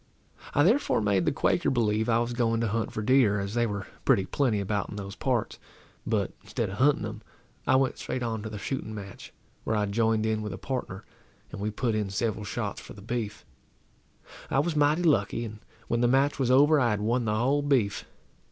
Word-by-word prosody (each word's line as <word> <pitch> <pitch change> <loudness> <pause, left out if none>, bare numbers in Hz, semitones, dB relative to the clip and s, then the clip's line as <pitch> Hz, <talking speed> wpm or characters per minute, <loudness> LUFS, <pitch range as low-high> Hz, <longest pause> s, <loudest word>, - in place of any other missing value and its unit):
I 145 - +5
therefore 230 - +3
made 100 -4 +1
the - - +3
Quaker - - +1
believe 110 -2 +1
I 115 - +4
was 120 +1 -1
going 115 -2 +1
to 115 - +1
hunt 115 +1 -1
for 110 - -4
deer, 115 -4 +4
as 100 +1 -4
they 120 0 +2
were 100 -2 -4 0.2
pretty 95 - +3
plenty 115 +1 0
about 100 -1 -2
in - - -7
those 100 0 -6
parts; 125 -2 -1 0.5
but, - - 0
instead - - -3
of 100 - -7
hunting 140 +4 +3
them, - - -6 0.5
I - - +5
went 130 0 +1
straight 125 - -3
on 110 -2 -2
to 110 - -5
the 105 - -6
shooting 110 0 -4
match, 100 -2 -9 0.3
where 110 - -1
I 105 -1 +1
joined 110 +1 +1
in 110 -1 0
with 105 -1 -4
a - - -6
partner, 125 -8 -5 0.5
and 100 - -7
we 105 - -1
put 115 +2 -1
in 105 -2 -1
several 105 +1 -2
shots 105 0 -4
for - - -11
the 100 - -13
beef. 110 -2 -4 1.0
I - - 0
was 155 +4 +1
mighty 150 +3 +3
lucky, 145 -7 +2
and 110 -1 -8 0.3
when 120 0 0
the 120 - +4
match 135 +3 +2
was 130 -2 +1
over 145 +4 +5
I 120 -3 +3
had 105 -1 -1
won 120 +3 +1
the 105 -1 0
whole 135 +6 +2
beef. 125 -9 +1
115 Hz, 215 wpm, -27 LUFS, 105-130 Hz, 1.0 s, I